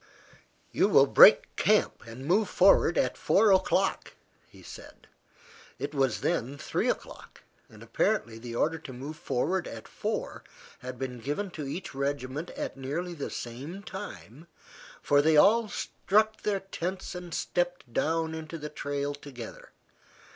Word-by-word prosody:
"You -, -, +3 dB
will -, -, +6 dB
break -, -, +7 dB
camp -, -, +2 dB
and 120 Hz, +4 st, -9 dB
move 195 Hz, +6 st, +2 dB
forward 180 Hz, -2 st, +5 dB
at -, -, +1 dB
four 210 Hz, 0 st, +3 dB
o'clock," 190 Hz, 0 st, +1 dB, 0.3 s
he -, -, -17 dB
said. -, -, -12 dB, 0.7 s
It 140 Hz, +3 st, -5 dB
was 135 Hz, -5 st, +1 dB
then 135 Hz, +5 st, -1 dB
three -, -, -1 dB
o'clock, -, -, -6 dB, 0.3 s
and -, -, -14 dB
apparently 115 Hz, 0 st, 0 dB
the 115 Hz, 0 st, -7 dB
order 165 Hz, +6 st, 0 dB
to 140 Hz, -4 st, -9 dB
move 140 Hz, +5 st, -7 dB
forward 175 Hz, +6 st, -1 dB
at 110 Hz, -1 st, -9 dB
four -, -, -4 dB, 0.4 s
had 125 Hz, 0 st, -7 dB
been 125 Hz, -1 st, -5 dB
given 150 Hz, -, -3 dB
to 150 Hz, -5 st, -6 dB
each 175 Hz, +7 st, -6 dB
regiment 140 Hz, +3 st, -3 dB
at -, -, -4 dB
nearly 150 Hz, +7 st, -4 dB
the 145 Hz, -4 st, -5 dB
same 140 Hz, +12 st, -7 dB
time, 170 Hz, -, -9 dB, 0.6 s
for 145 Hz, 0 st, +4 dB
they 155 Hz, +1 st, +4 dB
all 215 Hz, +7 st, +5 dB
struck 215 Hz, +3 st, 0 dB
their 200 Hz, -2 st, -1 dB
tents 185 Hz, -1 st, -5 dB
and 180 Hz, -1 st, -8 dB
stepped 175 Hz, -8 st, -2 dB
down 160 Hz, +3 st, 0 dB
into 160 Hz, +1 st, -6 dB
the 150 Hz, -1 st, -6 dB
trail 145 Hz, -1 st, -3 dB
together. 140 Hz, -5 st, -10 dB
150 Hz, 145 wpm, -28 LUFS, 135-180 Hz, 0.7 s, break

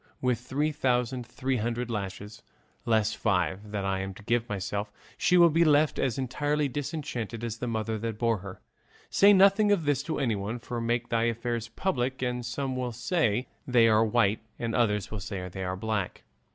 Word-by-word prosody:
With 125 Hz, -3 st, +1 dB
three 140 Hz, +5 st, -1 dB
thousand 125 Hz, -3 st, 0 dB
three 130 Hz, +1 st, -2 dB
hundred 120 Hz, +2 st, -2 dB
lashes, 100 Hz, 0 st, -5 dB, 0.5 s
less 110 Hz, -2 st, +2 dB
five, 95 Hz, 0 st, 0 dB
that 100 Hz, -2 st, -3 dB
I'm 95 Hz, 0 st, -2 dB
to 105 Hz, -, -13 dB
give 120 Hz, +2 st, 0 dB
myself, 100 Hz, +1 st, -3 dB, 0.2 s
she 180 Hz, 0 st, +3 dB
will 170 Hz, -1 st, +7 dB
be 165 Hz, +2 st, +4 dB
left 150 Hz, -1 st, +3 dB
as 130 Hz, -2 st, 0 dB
entirely 145 Hz, +3 st, 0 dB
disenchanted 135 Hz, -5 st, -4 dB
as 115 Hz, -1 st, -3 dB
the 125 Hz, -, -3 dB
mother 110 Hz, -1 st, -2 dB
that 115 Hz, 0 st, -3 dB
bore 115 Hz, -2 st, +1 dB
her. 95 Hz, 0 st, -9 dB, 0.5 s
Say 200 Hz, +1 st, +6 dB
nothing 200 Hz, +2 st, +5 dB
of 180 Hz, -6 st, +2 dB
this 145 Hz, -2 st, +2 dB
to -, -, 0 dB
anyone; 110 Hz, -4 st, -1 dB
for, 120 Hz, 0 st, -5 dB
make 120 Hz, +1 st, -1 dB
thy 115 Hz, 0 st, +2 dB
affairs 115 Hz, 0 st, -2 dB
public, 130 Hz, -1 st, -2 dB
and 125 Hz, 0 st, -1 dB
some 130 Hz, +2 st, -3 dB
will 125 Hz, -1 st, -2 dB
say 125 Hz, -, 0 dB, 0.2 s
they 120 Hz, -3 st, +5 dB
are 110 Hz, 0 st, +5 dB
white 110 Hz, -2 st, +2 dB, 0.2 s
and 115 Hz, -1 st, -3 dB
others 105 Hz, -4 st, +1 dB
will 110 Hz, -, -4 dB
say 95 Hz, -1 st, -5 dB
they 95 Hz, +1 st, -6 dB
are 90 Hz, 0 st, -3 dB
black. 105 Hz, -2 st, -3 dB
120 Hz, 185 wpm, -28 LUFS, 105-130 Hz, 0.5 s, will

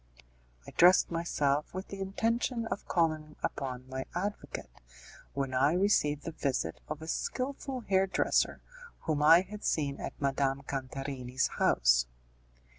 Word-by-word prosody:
I -, -, -10 dB
dressed 180 Hz, +1 st, +6 dB
myself 150 Hz, -3 st, 0 dB
with 185 Hz, +1 st, -5 dB
the 195 Hz, -, -7 dB
intention 230 Hz, +4 st, 0 dB
of 200 Hz, -, -4 dB
calling 155 Hz, -3 st, 0 dB
upon 130 Hz, -2 st, -3 dB
my 130 Hz, 0 st, -4 dB
advocate, 200 Hz, +4 st, -4 dB, 0.6 s
when 135 Hz, -1 st, -2 dB
I 135 Hz, +4 st, +3 dB
received 175 Hz, -6 st, +2 dB
the 165 Hz, -, -4 dB
visit 135 Hz, -, -2 dB
of 155 Hz, +1 st, -5 dB
a -, -, -8 dB
skilful 265 Hz, -, -3 dB
hair 195 Hz, -3 st, +2 dB
dresser 190 Hz, -, +1 dB, 0.4 s
whom 155 Hz, -2 st, -1 dB
I 165 Hz, +3 st, +8 dB
had 210 Hz, +2 st, -9 dB
seen 140 Hz, -3 st, 0 dB
at -, -, -6 dB
Madame 135 Hz, 0 st, 0 dB
Cantarini's 130 Hz, -1 st, -3 dB
house. -, -, +4 dB
155 Hz, 135 wpm, -31 LUFS, 135-190 Hz, 0.6 s, I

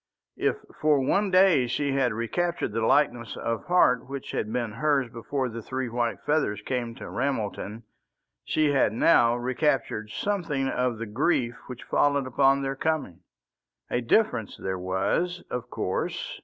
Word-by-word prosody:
If -, -, +2 dB, 0.3 s
for 150 Hz, -2 st, +4 dB
one 195 Hz, +10 st, +1 dB
day 185 Hz, -9 st, +5 dB
she 140 Hz, +4 st, -1 dB
had 135 Hz, -3 st, +2 dB
recaptured 115 Hz, +8 st, -1 dB
the 115 Hz, +1 st, -1 dB
lightness 120 Hz, -3 st, +2 dB
of 115 Hz, -1 st, -3 dB
heart 125 Hz, -9 st, +3 dB
which 140 Hz, -1 st, -6 dB
had 105 Hz, -, -2 dB
been 120 Hz, -2 st, -2 dB
hers 135 Hz, 0 st, +1 dB
before 130 Hz, +3 st, -2 dB
the 115 Hz, -1 st, -6 dB
three 130 Hz, +3 st, -3 dB
white 120 Hz, 0 st, -1 dB
feathers 145 Hz, -9 st, +1 dB
came 120 Hz, -2 st, -3 dB
to -, -, -8 dB
Ramelton, 115 Hz, -4 st, -3 dB, 0.6 s
she 155 Hz, -2 st, +1 dB
had 135 Hz, -6 st, +2 dB
now 120 Hz, -1 st, +4 dB
recaptured 125 Hz, -3 st, -1 dB
something 165 Hz, -, -1 dB
of 125 Hz, -3 st, 0 dB
the 115 Hz, -, -4 dB
grief 120 Hz, +2 st, +1 dB
which 125 Hz, -2 st, -8 dB
followed 140 Hz, -2 st, +2 dB
upon 135 Hz, +2 st, +3 dB
their 135 Hz, 0 st, -2 dB
coming. 145 Hz, -, -2 dB, 0.7 s
A 120 Hz, -, +1 dB
difference 120 Hz, -, +1 dB
there 95 Hz, -1 st, -3 dB
was, 95 Hz, -, -1 dB
of 125 Hz, -1 st, -4 dB
course. -, -, -3 dB
125 Hz, 155 wpm, -26 LUFS, 115-145 Hz, 0.7 s, day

